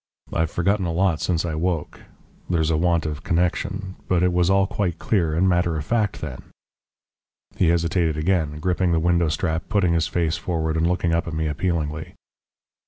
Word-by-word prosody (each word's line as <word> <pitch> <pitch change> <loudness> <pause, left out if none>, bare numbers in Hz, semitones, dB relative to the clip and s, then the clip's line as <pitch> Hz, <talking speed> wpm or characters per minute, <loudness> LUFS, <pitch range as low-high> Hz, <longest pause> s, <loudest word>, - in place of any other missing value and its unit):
I've 80 -1 +1
forgotten 95 +3 0
a - - -1
lot 90 -1 +1
since 85 -2 0
I 85 - -2
woke 80 -1 -2 0.5
there's 80 -2 +1
a - - +2
want 85 0 +1
of 75 -2 -4
connection 95 +3 -1
but 90 -1 +2
it 90 -1 +2
was 90 0 +2
all 95 0 +4
quite 100 -3 -2
clear 85 -8 0
and 90 +4 +3
matter 85 -2 +2
of 75 - -4
fact 110 -1 0
then." 65 -5 -6 1.1
He 90 - +2
hesitated 85 -1 +1
again, 80 -2 0
gripping 90 +1 +1
the 80 - +3
window 85 0 +2
strap, 80 0 -2
putting 100 -6 +2
his 85 -1 +1
face 85 -2 0
forward 80 -4 -2
and 80 +1 +2
looking 90 -1 0
up 85 0 0
at 80 - -4
me 80 0 -1
appealingly. 80 0 -2
85 Hz, 185 wpm, -23 LUFS, 80-90 Hz, 1.1 s, all